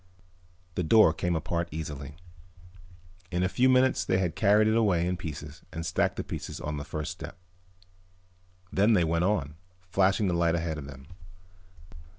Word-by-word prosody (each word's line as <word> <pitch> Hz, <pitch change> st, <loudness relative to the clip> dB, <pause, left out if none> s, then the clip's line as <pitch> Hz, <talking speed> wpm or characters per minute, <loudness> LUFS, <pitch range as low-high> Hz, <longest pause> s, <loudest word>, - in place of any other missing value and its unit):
The 90 Hz, -, -1 dB
door 90 Hz, -1 st, +5 dB
came 85 Hz, +1 st, -1 dB
apart 85 Hz, +1 st, -2 dB
easily. 75 Hz, -3 st, -6 dB, 1.1 s
In 90 Hz, +1 st, -1 dB
a -, -, +3 dB
few 125 Hz, +7 st, +2 dB
minutes 130 Hz, 0 st, +3 dB
they 95 Hz, -, +1 dB
had 90 Hz, -3 st, -1 dB
carried 105 Hz, +1 st, +4 dB
it 110 Hz, -, +2 dB
away 95 Hz, -7 st, +2 dB
in 90 Hz, +1 st, 0 dB
pieces 75 Hz, -3 st, -7 dB
and 80 Hz, 0 st, -5 dB
stacked -, -, 0 dB
the -, -, -3 dB
pieces -, -, -6 dB
on 75 Hz, 0 st, -4 dB
the 70 Hz, -, -4 dB
first 75 Hz, +2 st, -4 dB
step. 90 Hz, +2 st, -9 dB, 1.4 s
Then 105 Hz, +4 st, +4 dB
they 90 Hz, -5 st, +4 dB
went 85 Hz, +2 st, +1 dB
on, 80 Hz, -7 st, -1 dB, 0.3 s
flashing 95 Hz, +2 st, +2 dB
the 90 Hz, -, 0 dB
light 85 Hz, -1 st, +2 dB
ahead 80 Hz, -2 st, -2 dB
of 70 Hz, -, -8 dB
them. 70 Hz, -1 st, -11 dB
85 Hz, 165 wpm, -28 LUFS, 80-95 Hz, 1.4 s, door